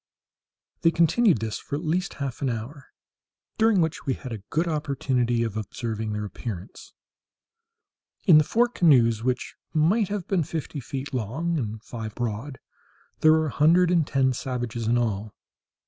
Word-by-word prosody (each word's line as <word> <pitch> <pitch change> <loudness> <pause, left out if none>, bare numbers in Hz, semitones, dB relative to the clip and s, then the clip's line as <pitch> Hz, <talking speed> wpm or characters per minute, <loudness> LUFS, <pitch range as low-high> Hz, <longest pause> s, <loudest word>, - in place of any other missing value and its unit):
They 165 - +5
continued 170 - +3
this 110 -1 -3
for - - -5
at 150 - -4
least 180 +4 -1
half 135 -4 -5
an 135 - +1
hour, 125 +5 -6 0.7
during 220 -4 +4
which 160 -3 -2
we 130 - +1
had 130 - -8
a 110 -3 -5
good 165 +3 0
opportunity 130 -6 0
of 110 -3 -3
observing 110 0 -4
their 105 0 -3
appearance. 100 -1 -8 1.3
In 165 -6 +8
the - - +4
four 235 +10 +2
canoes, 125 - +3
which 125 0 -1 0.2
might 185 +8 +3
have 200 -3 -4
been 190 -3 +1
fifty 155 -1 -4
feet 135 +2 -6
long 140 +9 -1
and 110 -3 -5
five 110 -2 -7
broad, 120 +3 -4 0.6
there 155 - +6
were 160 0 +2
a 150 - -3
hundred 170 +5 +4
and 165 -4 +2
ten 130 -2 +2
savages 120 -3 -3
in 120 +1 +3
all. 110 -3 -2
135 Hz, 160 wpm, -25 LUFS, 115-160 Hz, 1.3 s, In